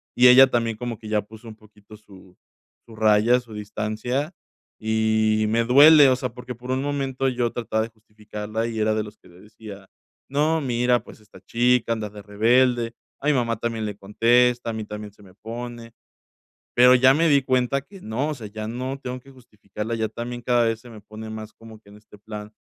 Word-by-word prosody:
y 125 - +6
ella 130 +2 +8
también 115 -2 -1
como 120 -1 -5
que 110 - -11
ya 105 -1 +1
puso 110 +3 -15
un 110 - -10
poquito 105 -1 -18
su 95 -3 -18 0.5
su 115 - -13
raya, 110 +3 +3
su 120 -3 -14
distancia, 110 - -4 0.5
y 110 0 +1
me 115 +1 +2
duele, 145 +3 +7
o 130 - +3
sea, 125 0 -3
porque 125 0 -8
por 125 +2 -7
un 130 +1 0
momento 135 -2 -2
yo 120 -2 -1
trataba 110 -2 -2
de 115 - -6
justificarla 110 0 -6
y 115 -1 -5
era 110 0 +1
de 110 - -1
los 105 0 -12
que - - -21
le 90 +1 -18
decía: 105 -2 -12 0.4
"No, 155 +4 +1
mira, 125 -2 +1
pues, - - -14
esta 105 - -17
chica, 120 0 +1
anda 110 -2 -4
de 105 0 -11
rebelde, 115 +3 +2 0.3
a 140 - -3
mi 150 - +4
mamá 115 -4 0
también 115 -2 -3
le 105 -2 -5
contesta, 120 +4 +2
a - - -6
mí 110 0 -4
también 105 -1 -8
se 105 - -22
me 95 -2 -17
pone", 115 +1 -8 0.8
pero 125 +1 +7
ya 130 +1 +5
me 165 +3 +2
di 140 -2 +4
cuenta 130 +1 0
que 195 +7 -15
no, 125 +8 -2
o - - -3
sea, 115 -6 -9
ya 110 +1 -7
no 130 +4 -4
tengo 125 -1 -6
que 135 - -18
justificarla, 110 -3 -8
ya 110 -1 -1
también 120 +2 -7
cada 120 0 +2
vez 115 -1 -1
se 120 - -14
me 110 -2 -12
pone 110 +2 -10
más 110 0 -8
como 110 -1 -14
que 100 - -20
en 105 - -15
este 105 -1 -18
plan 105 0 -9
115 Hz, 215 wpm, -23 LUFS, 110-125 Hz, 0.8 s, ella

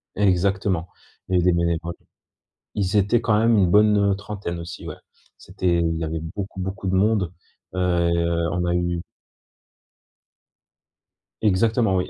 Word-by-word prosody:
Exactement, 95 -2 +1 0.4
il 95 - -4
y - - +4
avait 90 0 +4
des - - +1
bénévoles 85 0 -1 0.8
ils 100 0 +1
étaient, 105 +4 +3
quand 105 -2 +2
même, 115 0 +4
une 90 -3 +3
bonne, 105 0 +5
heu, 100 -1 +2
trentaine, 100 -4 -5
aussi, 85 0 -8
ouais. - - -7 0.4
C'était 90 -2 -1
il 80 -1 0
y 80 - -3
avait 80 +1 -3 0.2
beaucoup, 100 -1 -5
beaucoup 95 +1 -4
de 95 - 0
monde. 100 -2 +2 0.4
Heu, 90 - -3 0.7
on 90 +1 -1
a 85 0 +1
eu 85 -1 -1 2.4
Exactement 110 0 +2
oui, 90 - -1
95 Hz, 150 wpm, -23 LUFS, 85-105 Hz, 2.4 s, bonne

